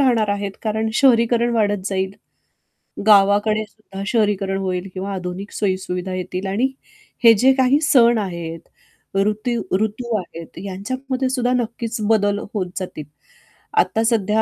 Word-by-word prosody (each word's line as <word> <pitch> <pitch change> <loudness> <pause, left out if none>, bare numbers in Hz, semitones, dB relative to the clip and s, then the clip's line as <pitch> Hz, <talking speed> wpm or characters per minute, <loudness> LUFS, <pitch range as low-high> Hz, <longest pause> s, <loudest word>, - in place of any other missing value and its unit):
राहणार 235 -6 +3
आहेत, 200 -1 -2
कारण 220 0 -1
शहरीकरण 235 -2 +4
वाढत 205 -4 +1
जाईल, 190 -1 -1 1.0
गावाकडे 205 +1 +5
सुद्धा 195 -3 -9
शहरीकरण 205 -4 +1
होईल 185 -1 -2
किंवा 195 +1 -4
आधुनिक 185 +2 -5
सोयी-सुविधा 185 -2 -2
येतील 185 +1 -4
आणि 210 +7 +1 0.6
हे 230 -1 +9
जे 255 +5 +4
काही 260 +2 +3
सण 240 -6 +5
आहेत 170 -4 -4 0.6
ऋतू 215 +4 0 0.2
ऋतू 220 +2 -2
आहेत 170 -3 -9
यांच्यामध्ये 255 +7 -3
सुद्धा 250 -1 0
नक्कीच 235 -1 -2
बदल 205 -2 +2
होत 190 -4 -2
जातील. 180 -5 -6 0.7
आत्ता 225 - +3
सध्या 220 -2 +2
210 Hz, 130 wpm, -20 LUFS, 190-235 Hz, 1.0 s, हे